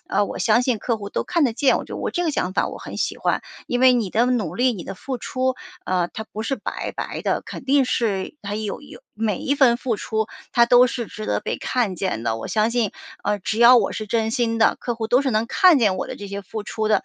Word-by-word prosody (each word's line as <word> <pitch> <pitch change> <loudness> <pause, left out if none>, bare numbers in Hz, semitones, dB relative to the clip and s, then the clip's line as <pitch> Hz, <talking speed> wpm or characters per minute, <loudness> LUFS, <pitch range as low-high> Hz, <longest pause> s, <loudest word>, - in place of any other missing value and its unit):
呃， 205 - +1
我 - - -6
相 230 +1 +4
信 245 -3 0
客 230 +2 -1
户 200 -2 -7
都 - - -2
看 335 -3 +1
得 245 - +1
见。 265 +4 +3
我 - - -4
觉 - - -11
得 - - -5
我 - - -2
这 350 -1 -1
个 320 - +1
想 185 -9 -1
法 - - +1
我 - - -8
很 - - -8
喜 - - -1
欢。 - - 0 0.3
因 245 - 0
为 260 -1 +7
你 225 -7 0
的 235 +3 +2
努 250 -4 0
力、 250 +1 +2
你 195 -6 -6
的 - - -6
付 255 +6 -5
出， 255 +1 -1 0.3
呃， 180 -2 0
它 220 - -5
不 215 0 -6
是 270 +4 -1
白 - - -5
白 - - -5
的， - - 0
肯 - - -9
定 275 +1 +4
是 210 -5 -1
它 205 0 -4
有 215 +2 -4
有 280 - -13
每 210 -3 -1
一 280 - 0
份 260 -4 +5
付 240 -1 -2
出， 220 +1 -2 0.3
它 235 0 +5
都 245 +1 +6
是 235 -2 -4
值 215 0 -8
得 - - 0
被 - - -3
看 235 -7 -1
见 175 - -2
的。 110 -1 0
我 115 - -6
相 215 +1 +1
信， 235 -4 0 0.3
呃， 205 0 0
只 215 +3 -3
要 240 +2 +8
我 220 -5 +2
是 215 - -5
真 225 0 0
心 230 -2 0
的， 225 - +4
客 240 - -2
户 225 -1 -3
都 250 +4 +3
是 270 - 0
能 215 +1 +1
看 355 +4 +5
见 205 -6 +2
我 - - -3
的 - - -6
这 205 - -8
些 200 0 -5
付 215 +3 -6
出 215 0 -2
的。 215 - +2
225 Hz, 295 characters per minute, -22 LUFS, 210-250 Hz, 0.3 s, 要